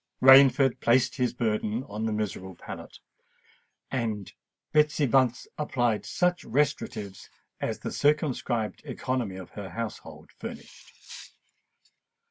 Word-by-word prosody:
Rainford 135 0 +7
placed 125 +2 +3
his 125 -2 +1
burden 110 0 -1
on 110 -1 -4
the - - -1
miserable 100 -3 -3
pallet, - - -9 0.9
and 110 -6 -3 0.4
Betsy 150 -1 +3
Bunce 125 -2 +2
applied 120 -7 0
such 180 -1 +1
restoratives 105 -8 -2 0.3
as - - -2
the - - -5
circumscribed 135 -7 0
economy 120 -6 -3
of 95 -1 -9
her 100 -2 -7
household 115 +3 -7
furnished. - - -11
120 Hz, 105 wpm, -27 LUFS, 105-135 Hz, 0.9 s, Rainford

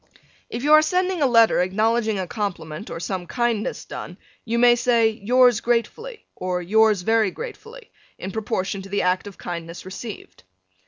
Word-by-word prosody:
If 240 - -5
you 300 +1 +4
are 310 - +8
sending 365 +2 0
a 280 - +4
letter 230 -6 +4
acknowledging 215 +3 +1
a 190 - -2
compliment 180 -3 -5
or - - -6
some 180 0 -4
kindness 240 -3 -2
done - - -8 0.3
you 230 0 -2
may 240 0 +6
say, 235 -2 +3
Yours 245 +4 +3
gratefully, 335 - -2
or 180 -1 -2
Yours 210 +1 +3
very 225 0 +2
gratefully, 460 - -10 0.3
in 190 - -6
proportion 195 -2 -3
to 195 - -11
the 200 +1 0
act 180 +2 0
of 200 - -11
kindness 170 0 -7
received. 195 +3 -9
220 Hz, 165 wpm, -22 LUFS, 190-245 Hz, 0.3 s, are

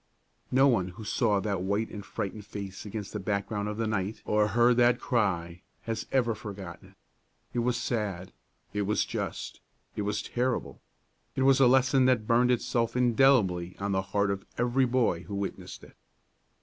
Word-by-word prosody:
No 135 +2 +5
one 115 -9 +2
who 95 +5 -9
saw 105 -1 +1
that 100 -3 -2
white 100 +4 -1
and 105 - -7
frightened 100 +2 -5
face 100 0 -7
against 105 -1 -6
the 105 - -3
background 100 +1 -2
of 105 - -5
the 115 - 0
night 110 -1 -2
or 105 0 +2
heard 120 +3 +3
that 120 0 +4
cry 90 -8 -1 0.2
has 115 -1 -4
ever 120 -3 +2
forgotten 100 -5 -9
it. - - -24 0.6
It 120 - 0
was 120 0 +1
sad, 100 -6 -3 0.4
it 105 - -1
was 105 +1 +1
just, - - -5 0.4
it - - -2
was 105 0 -2
terrible! 125 0 -2 0.5
It 130 - +1
was 135 0 +5
a 135 - +6
lesson 130 +1 +4
that 125 -4 +3
burned 120 +2 +3
itself 120 -1 0
indelibly 115 -8 +3
on 100 0 -2
the 95 0 +1
heart 100 +1 0
of 100 0 -4
every 125 +2 +2
boy 120 -9 +1
who 100 - -6
witnessed 100 0 -5
it. - - -15
105 Hz, 175 wpm, -28 LUFS, 100-120 Hz, 0.6 s, a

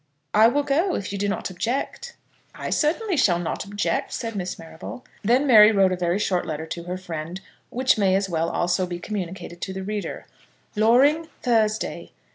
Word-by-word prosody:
"I 215 +2 +7
will 285 +5 +1
go, 325 +7 +1
if 195 - -4
you 200 - -4
do 205 0 0
not 195 - -3
object." 270 - -3 0.4
"I - - -5
certainly 355 +6 +1
shall 190 - +3
not 175 -1 -3
object," 205 +1 -2
said 225 -2 -4
Miss 180 -2 -3
Marrable. 165 +9 -9 0.2
Then 245 +7 +3
Mary 220 -5 +8
wrote 195 -3 +3
a - - +1
very 175 0 0
short 185 -3 0
letter 160 0 -4
to 170 +1 -6
her 180 +1 -4
friend, 170 -1 -6 0.3
which 255 -2 +2
may 190 -2 +3
as 195 0 +1
well, 165 -2 -1
also, 180 +1 0
be 175 -1 -4
communicated 175 -2 -6
to 190 - -4
the 190 0 -5
reader: 210 +1 -4 0.5
Loring, 265 +9 +4 0.2
Thursday. 220 -3 0
200 Hz, 185 wpm, -24 LUFS, 180-240 Hz, 0.5 s, Mary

